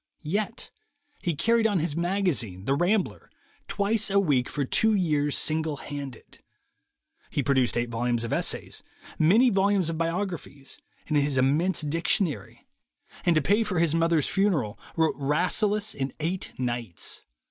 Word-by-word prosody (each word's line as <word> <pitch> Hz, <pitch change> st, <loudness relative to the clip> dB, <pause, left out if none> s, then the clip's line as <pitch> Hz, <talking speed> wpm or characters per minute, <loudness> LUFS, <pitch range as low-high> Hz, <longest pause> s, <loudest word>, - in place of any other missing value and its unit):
Yet 205 Hz, +9 st, -3 dB, 0.5 s
he 170 Hz, -3 st, -1 dB
carried 230 Hz, +8 st, +3 dB
on 205 Hz, -3 st, +1 dB
his 155 Hz, -3 st, -1 dB
magazine, 170 Hz, -, -1 dB
the 135 Hz, -, +2 dB
Rambler, 180 Hz, +7 st, 0 dB, 0.4 s
twice 210 Hz, +1 st, 0 dB
a 200 Hz, 0 st, +3 dB
week 140 Hz, -10 st, +1 dB
for 145 Hz, -2 st, -2 dB
two 220 Hz, +10 st, +3 dB
years 150 Hz, -6 st, +1 dB
single 155 Hz, -1 st, 0 dB
handed; 140 Hz, -4 st, -8 dB, 0.9 s
he 145 Hz, -, -1 dB
produced 130 Hz, -3 st, +2 dB
eight 120 Hz, 0 st, -1 dB
volumes 120 Hz, 0 st, -1 dB
of 115 Hz, -, -3 dB
essays, -, -, -2 dB, 0.4 s
many 220 Hz, +11 st, +5 dB
volumes 195 Hz, -3 st, +2 dB
of 160 Hz, -, -5 dB
biographies, 165 Hz, -5 st, -4 dB, 0.3 s
and 155 Hz, -, +1 dB
his 140 Hz, -1 st, +1 dB
im 135 Hz, +2 st, +3 dB
mense 180 Hz, +3 st, 0 dB
Dictionary; 155 Hz, -, -1 dB, 0.6 s
and 170 Hz, -, +5 dB
to 155 Hz, -, +2 dB
pay 205 Hz, +8 st, +3 dB
for 185 Hz, -5 st, -3 dB
his 165 Hz, -2 st, +2 dB
mother's 165 Hz, -2 st, +2 dB
funeral, 165 Hz, -, 0 dB, 0.2 s
wrote 160 Hz, -1 st, +2 dB
Rasselas 200 Hz, +9 st, +1 dB
in 135 Hz, -1 st, -4 dB
eight 175 Hz, +4 st, -3 dB
nights. 120 Hz, -7 st, -3 dB
160 Hz, 145 wpm, -26 LUFS, 140-195 Hz, 0.9 s, many